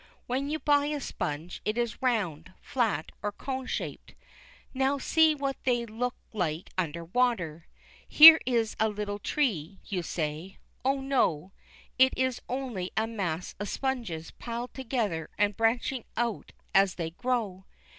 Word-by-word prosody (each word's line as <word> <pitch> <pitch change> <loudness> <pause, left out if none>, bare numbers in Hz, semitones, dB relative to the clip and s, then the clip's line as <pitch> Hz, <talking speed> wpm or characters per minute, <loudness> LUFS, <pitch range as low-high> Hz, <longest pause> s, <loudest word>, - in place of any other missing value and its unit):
When 265 +3 -2
you 310 - -1
buy 290 -1 +2
a 300 -1 -2
sponge, 160 - -4
it 215 +2 -1
is 235 -1 -2
round, 185 - -1
flat, 220 - -1
or 205 - -2
cone 260 +4 -5
shaped. - - -5 0.6
Now 270 +1 +1
see 315 +3 +4
what 275 -2 -2
they 240 -2 +1
look 235 +3 -3 0.2
like 170 -5 -2
under 170 -2 -2
water. 175 -7 0 0.4
Here 320 +1 +11
is 230 -3 +1
a 220 - +3
little 205 -1 -4
tree, 195 - -1
you 185 -3 -2
say. 165 +2 -4 0.3
Oh, 270 +1 +1
no, 195 - +1 0.5
it 260 0 +6
is 260 -1 0
only 245 -8 -3
a 220 - +3
mass 185 -7 -3
of 205 - -3
sponges 230 -12 -3
piled 240 +1 -6
together 225 - -2
and 205 0 +2
branching 230 +3 0
out 235 -2 -2 0.2
as 195 -1 +4
they 165 -2 -4
grow. 210 -3 -2
225 Hz, 145 wpm, -28 LUFS, 185-260 Hz, 0.6 s, Here